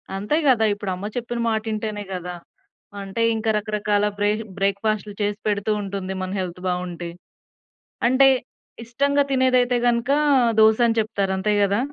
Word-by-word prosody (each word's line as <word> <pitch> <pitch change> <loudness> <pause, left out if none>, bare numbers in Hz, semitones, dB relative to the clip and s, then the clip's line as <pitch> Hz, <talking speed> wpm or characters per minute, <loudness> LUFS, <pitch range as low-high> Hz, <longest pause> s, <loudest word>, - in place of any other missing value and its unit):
అంతే 205 +9 -1
గదా! 235 -4 +4
ఇప్పుడు 205 -2 -4
అమ్మ 185 +3 -7
చెప్పిన 240 -1 -3
మాట 220 -1 +1
వింటేనే 215 -1 -3
గదా! 180 -1 -5 0.7
అంటే 195 +3 -4
ఇంక 220 0 -4
రకరకాల 210 -1 0
బ్రే 205 0 +2 0.3
బ్రేక్‌ఫాస్టులు 200 +1 -1
చేసి 205 0 -1
పెడుతూ 205 0 0
ఉంటుంది. 195 -1 -4
మన 185 0 -4
హెల్త్ 180 -1 -5
బావుంటే 180 -1 -3 1.0
అంటే 260 +2 +5 0.6
ఇష్టంగా 280 +5 +1
తినేదైతే 255 -2 +3
గనుక 240 +2 +1 0.5
దోసని 225 +1 +4
చెప్తారు. 205 -3 -1
అంతే 200 +3 0
గదా! 200 +1 +1
210 Hz, 135 wpm, -22 LUFS, 195-235 Hz, 1.0 s, అంటే